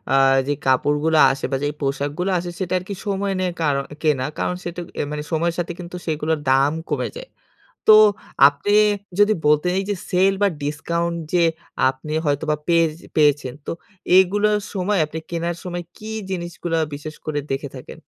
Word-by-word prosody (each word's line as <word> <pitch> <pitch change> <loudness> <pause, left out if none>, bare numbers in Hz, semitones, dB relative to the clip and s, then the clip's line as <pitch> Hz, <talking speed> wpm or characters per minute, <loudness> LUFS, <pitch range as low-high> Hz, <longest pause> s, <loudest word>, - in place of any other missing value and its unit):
আ - - +5 0.3
যে 145 - +2
কাপড়গুলো 150 +4 +2
আসে 135 - -4
বা 135 - +1
যেই 145 0 -1
পোশাকগুলো 145 +6 -1
আসে, 175 0 -4
সেটা 185 -1 -2
আর - - -10
কি - - -2
সময় 200 0 -1
নিয়ে 180 -1 0
কারণ 140 -3 +1 0.2
কেনা। 145 -5 +1
কারণ 180 - -1
সেটা 175 0 -5 0.2
এ - - +2
মানে, 150 0 -3
সময়ের 170 +1 0
সাথে 175 0 -2
কিন্তু, 180 0 -8
সেগুলোর 155 0 0
দাম 135 +2 +4 0.2
কমে - - -1
যায়। - - -9 0.6
তো 215 - +11 0.5
আপনি 145 +9 -1 0.5
যদি 205 +1 +5
বলতেন, 150 +4 +3
এই 195 - -3
যে 205 - 0 0.2
সেল 190 +2 +4
বা 205 - +5 0.2
ডিসকাউন্ট 170 +3 -2 0.2
যে 175 -1 +4 0.5
আপনি 135 +3 -6
হয়তোবা 150 +1 +1
পেয়ে 170 -1 +4 0.3
পেয়েছেন, 145 -4 +3
তো - - -3 0.5
এগুলোর 205 +3 +3 0.2
সময়, 195 0 0
আপনি 160 +2 -6
কেনার 170 0 -2
সময় 175 -1 -4
কী 215 +1 -8 0.2
জিনিসগুলো 175 -2 -3 0.2
বিশেষ 155 +2 -7
করে 150 -1 -1
দেখে 135 +1 -2
থাকেন? 130 - -10
165 Hz, 170 wpm, -21 LUFS, 145-180 Hz, 0.6 s, তো